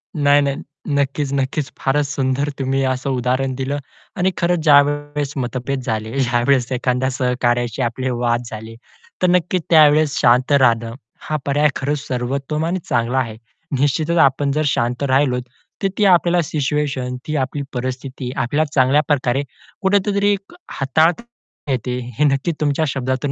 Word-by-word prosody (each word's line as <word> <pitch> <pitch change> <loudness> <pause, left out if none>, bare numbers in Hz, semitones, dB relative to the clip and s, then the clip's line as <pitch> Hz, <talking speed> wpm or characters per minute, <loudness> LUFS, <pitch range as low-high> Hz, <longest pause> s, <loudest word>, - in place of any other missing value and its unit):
नाही 145 -1 +4
नाही, 140 -1 0 0.4
नक्कीच, 140 0 0
नक्कीच. 140 +1 -1
फारच 145 +2 +1
सुंदर 140 0 -1
तुम्ही 135 0 0
असं 130 +1 -1
उदाहरण 130 +1 0
दिलं 135 +2 -2 0.4
आणि 185 +1 +2
खरंच 175 0 +1
ज्यावेळेस 145 -1 +3
मतभेद 130 +1 -3
झाले, 110 +2 -3
ज्यावेळेस 125 0 +2
एखाद्या 125 +1 0
सहकार्याशी 125 -1 0
आपले 130 +2 -1
वाद 120 -1 0
झाले, 110 +1 -8 0.5
तर 180 - +4
नक्कीच 180 0 +1
त्यावेळेस 155 -2 +5
शांत 125 +3 +3
राहणं, 115 -5 +3 0.3
हा 155 - -3
पर्याय 145 +2 +3
खरच 145 +2 -1
सर्वोत्तम 135 +5 -2
आणि 180 +3 -1
चांगला 120 +1 0
आहे. 115 -4 -1 0.4
निश्चितच 155 +4 +1
आपण 140 0 +3
जर 150 +2 0
शांत 125 -1 0
राहिलो, 130 -1 +2 0.4
तर - - +4
ती 210 - +3
आपल्याला 175 -1 +4
सिच्युएशन, 140 -3 -2
ती 155 - -2
आपली 140 +1 -2
परिस्थिती 130 0 -4
आपल्याला 140 +4 0
चांगल्या 135 +2 +4
प्रकारे 135 -2 +1 0.4
कुठतरी 200 +1 +2
एक 200 - -7
अ, - - -15
हाताळता 160 - +1 0.5
येते, 125 0 -2 0.2
हे 150 - +2
नक्की 140 +3 +1
तुमच्या 150 +1 +1
शब्दातून 130 +1 -2
135 Hz, 145 wpm, -19 LUFS, 125-150 Hz, 0.5 s, त्यावेळेस